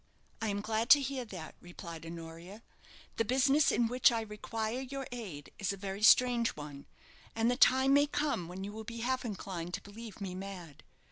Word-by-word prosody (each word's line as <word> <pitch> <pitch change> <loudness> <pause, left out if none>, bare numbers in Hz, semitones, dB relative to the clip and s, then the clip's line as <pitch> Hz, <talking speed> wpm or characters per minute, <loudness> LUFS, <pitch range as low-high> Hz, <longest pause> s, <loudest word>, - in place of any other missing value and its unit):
"I 225 - 0
am 205 -1 -1
glad 220 +3 -1
to 290 - +10
hear 270 -2 -3
that," 180 -7 -8
replied 170 -2 -9
Honoria. 170 +5 -9 0.5
"The 225 - +3
business 270 +5 +3
in 235 - +2
which 250 +1 +4
I 230 -1 0
require 220 +2 -4
your 270 +1 -5
aid 195 -12 -7
is 200 - 0
a 200 - -5
very 195 +1 -5
strange 240 +1 +6
one; 145 -2 -9 0.5
and 225 +2 +2
the - - +1
time 265 +1 +5
may 285 +1 +5
come 290 - -1
when 185 +2 -7
you 200 - -5
will 220 +1 -7
be 230 +1 -7
half 255 +2 0
inclined 185 -6 -4
to - - -8
believe 215 0 -10
me 195 -3 -4
mad. 180 -6 -8
215 Hz, 195 wpm, -32 LUFS, 185-245 Hz, 0.5 s, to